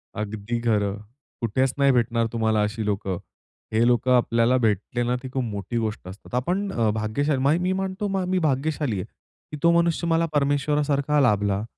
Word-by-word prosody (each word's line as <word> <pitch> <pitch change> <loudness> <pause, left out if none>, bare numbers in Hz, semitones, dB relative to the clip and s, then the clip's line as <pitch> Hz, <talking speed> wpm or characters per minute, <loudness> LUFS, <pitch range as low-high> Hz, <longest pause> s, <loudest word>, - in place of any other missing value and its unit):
अगदी 105 +2 -3
खरं. 105 -4 +1 0.4
कुठेच 130 +3 +1
नाही 140 0 +5
भेटणार 115 -2 +1
तुम्हाला 110 -2 +1
अशी 110 +1 -2
लोकं. 100 -3 -2 0.6
हे 115 +2 +3
लोकं 125 +1 +2
आपल्याला 115 +1 +2
भेटले 115 +1 0
ना, 120 +1 0
ती 130 - -6
खूप 130 -1 -1
मोठी 105 +1 -4
गोष्ट 110 -4 -3
असतात. 95 +6 -9
आपण 180 +11 -1
अ, 115 -2 +1
भाग्यशाली 130 +7 -1
म 145 +3 +4
मी 180 +1 0
म्हणतो 190 +1 -2
म 195 -1 -1
मी 185 0 +2
भाग्यशाली 140 -4 -1
आहे, 90 - -4 0.5
की 150 - -5
तो 170 - +6
मनुष्य 170 0 0
मला 165 0 +2
परमेश्वरासारखा 145 0 +1
लाभला. 105 -4 +2
120 Hz, 175 wpm, -24 LUFS, 110-145 Hz, 0.6 s, तो